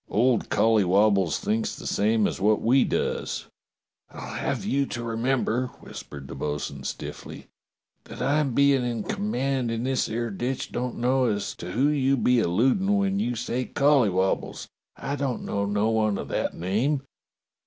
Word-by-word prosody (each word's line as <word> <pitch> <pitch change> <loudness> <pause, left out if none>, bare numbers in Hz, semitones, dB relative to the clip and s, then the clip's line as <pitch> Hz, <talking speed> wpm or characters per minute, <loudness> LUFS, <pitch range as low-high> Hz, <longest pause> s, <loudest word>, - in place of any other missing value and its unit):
"Old 120 +2 +2
Collywobbles 100 -4 +3
thinks 110 +1 -1
the - - -10
same 110 +1 +2
as - - -2
wot 105 +1 +3
we 130 +3 +4
does." - - -2 0.6
"I'll - - -8
have - - -2
you 140 0 +1
to 120 - -5
remember," 120 +1 0
whispered 70 -2 -9
the - - -8
bo'sun 75 -2 -4
stiffly, - - -7 0.6
"that - - -10
I 140 +5 +2
bein' 140 -1 +3
in 120 -3 -2
command 135 - -1
in 115 0 -2
this 130 0 0
'ere 115 +1 -2
ditch 125 +6 -3
don't 125 0 -3
know 130 +2 +2
as 105 -4 -1
to 90 +1 -6
who 135 +5 +3
you 135 -2 +2
be 125 0 +3
alludin' 130 - +2
when 195 0 +1
you 120 -11 -1
say 120 +2 -2
Colly 140 -6 +3
wobbles. 95 +1 -1 0.3
I 140 - -3
don't 140 -3 -2
know 100 0 -1
no 105 +2 +1
one 110 -2 +1
of - - -6
that - - -1
name." 115 - 0
120 Hz, 165 wpm, -26 LUFS, 105-135 Hz, 0.6 s, we